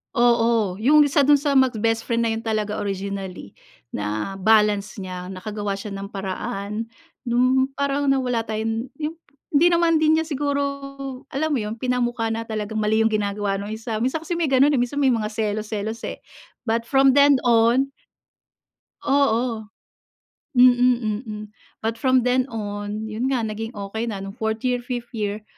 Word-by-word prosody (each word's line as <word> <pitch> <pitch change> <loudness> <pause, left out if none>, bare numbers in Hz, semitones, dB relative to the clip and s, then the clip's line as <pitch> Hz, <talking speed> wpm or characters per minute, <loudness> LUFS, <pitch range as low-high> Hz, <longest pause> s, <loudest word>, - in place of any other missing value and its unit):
Oo, 230 -5 +2
yung 295 +6 +6
1 280 -1 +2
dun 290 - +7
sa 280 -1 +3
mag-best 225 -3 +1
friend 235 0 +1
na 230 - +1
yun, 225 - -2
talaga 215 -2 -2
originally 195 - -5 0.4
na-balance 195 - +1
niya. 180 -1 -6
Nakagawa 200 +2 -4
siya 200 +1 -7
ng 195 0 -5
paraan, 200 +2 -4 0.4
nung 255 +2 +3
parang 280 0 0
na 275 - +4
wala 245 -2 0
tayon 225 +2 -2
hmm, 310 +2 -4 0.4
hindi 330 +5 +6
naman 335 -1 +3
din 315 0 +4
niya 320 - -2
siguro, 285 -1 -1 0.7
alam 310 +3 -1
mo - - 0
yun, 210 +1 -4
pinamukha 240 -2 0
na 225 0 -2
talagang 215 -1 -4
mali 215 +1 +2
yung - - +4
ginagawa 205 -1 -1
nung 205 +1 -6
1. 220 0 -4
Minsan 260 +6 0
kasi 345 0 -3
may 330 - +1
ganon 270 +2 +5
eh, 280 - +2
minsan 245 +4 -1
may 265 - +5
mga 220 -3 0
selos 215 0 -2
selos 220 +2 -3
eh, - - -6 0.4
but 230 0 0
from 270 +1 +5
then 285 +1 +6
on 235 +3 +4 1.2
Oo. 240 -5 +1 0.9
Mm, 245 -3 +4
mm. 210 0 -6 0.4
But 225 +1 -2
from 255 0 +3
then 250 +1 +2
on, 205 -1 -5
yun 220 +4 -2
nga 255 -4 0
naging 220 +1 -5
okey 205 +3 -4
na 200 -4 -4
nong 195 0 -7
4th 220 0 -2
year, 250 -1 +1
5th 245 -1 -6
year, 210 -2 -3
225 Hz, 165 wpm, -23 LUFS, 210-255 Hz, 1.2 s, dun